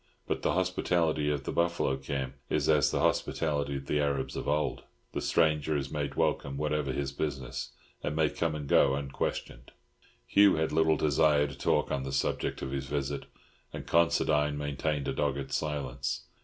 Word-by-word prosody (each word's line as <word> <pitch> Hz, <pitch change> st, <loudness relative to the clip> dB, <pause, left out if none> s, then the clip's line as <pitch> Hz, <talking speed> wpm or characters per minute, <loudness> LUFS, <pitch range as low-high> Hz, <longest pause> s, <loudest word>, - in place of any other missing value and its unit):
But -, -, -1 dB
the -, -, +1 dB
hospitality 85 Hz, -4 st, +1 dB
of 75 Hz, -2 st, -1 dB
the -, -, -3 dB
buffalo 85 Hz, -5 st, +1 dB
camp 65 Hz, -1 st, -4 dB, 0.2 s
is -, -, +1 dB
as -, -, +4 dB
the -, -, 0 dB
hospitality 70 Hz, -3 st, 0 dB
of 70 Hz, -, -8 dB
the 75 Hz, -, 0 dB
Arabs 70 Hz, -2 st, -1 dB
of -, -, -4 dB
old—the 75 Hz, +1 st, -3 dB
stranger 75 Hz, -1 st, +2 dB
is 70 Hz, -1 st, -4 dB
made 75 Hz, -2 st, -3 dB
welcome 70 Hz, -1 st, 0 dB
whatever 75 Hz, -2 st, 0 dB
his 70 Hz, +1 st, -2 dB
business, 65 Hz, -3 st, -4 dB, 0.3 s
and 75 Hz, -, -2 dB
may 80 Hz, -1 st, +3 dB
come 80 Hz, -2 st, -1 dB
and 75 Hz, -2 st, -5 dB
go 70 Hz, 0 st, +4 dB
unquestioned. 70 Hz, -1 st, -4 dB, 0.5 s
Hugh 100 Hz, +8 st, +5 dB
had 80 Hz, 0 st, 0 dB
little 80 Hz, -1 st, +3 dB
desire 75 Hz, 0 st, +3 dB
to 70 Hz, -2 st, -6 dB
talk -, -, +1 dB
on 70 Hz, -, 0 dB
the 65 Hz, 0 st, -4 dB
subject -, -, -1 dB
of 65 Hz, -, -4 dB
his 70 Hz, 0 st, -3 dB
visit, 70 Hz, -1 st, -3 dB, 0.4 s
and -, -, -7 dB
Considine 75 Hz, -3 st, +2 dB
maintained 75 Hz, 0 st, -2 dB
a -, -, 0 dB
dogged 70 Hz, -2 st, -1 dB
silence. 70 Hz, -4 st, -2 dB
75 Hz, 170 wpm, -30 LUFS, 70-75 Hz, 0.5 s, Hugh